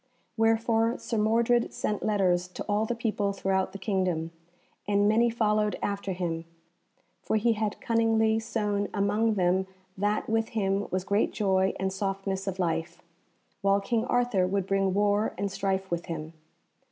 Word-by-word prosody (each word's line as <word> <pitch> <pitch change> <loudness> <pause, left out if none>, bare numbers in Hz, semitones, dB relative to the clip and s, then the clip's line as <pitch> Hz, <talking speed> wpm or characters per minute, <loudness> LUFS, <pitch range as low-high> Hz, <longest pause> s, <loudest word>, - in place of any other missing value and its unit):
Wherefore 225 +1 +2
Sir 230 - -3
Mordred 230 +2 +2
sent 210 - -2
letters 185 -4 +1
to 180 - -7
all 210 +1 +1
the 240 - -1
people 210 -3 -1
throughout 190 -1 0
the - - -7
kingdom, 185 -5 -1 0.6
and 205 0 +3
many 230 +3 +4
followed 215 -2 +1
after 200 -1 -2
him, 170 -2 -3 0.8
for - - -1
he 230 +2 +3
had 215 -1 -2
cunningly 225 -1 +2
sown 210 -2 -1
among 210 +2 +1
them 185 0 +2 0.3
that 205 +2 0
with 225 0 0
him 195 0 0
was 185 0 -1
great 200 +2 +1
joy 190 -2 +1
and 190 0 -1
softness 195 0 -3
of 190 -1 -2
life, 170 0 -2 0.6
while 200 0 +3
King 225 +2 0
Arthur 245 -7 +1
would 195 0 -1
bring 195 -1 +1
war 205 +1 +1
and 200 -1 -2
strife 190 -1 -2
with 170 0 -2
him. 160 -1 -5
200 Hz, 155 wpm, -28 LUFS, 190-220 Hz, 0.8 s, many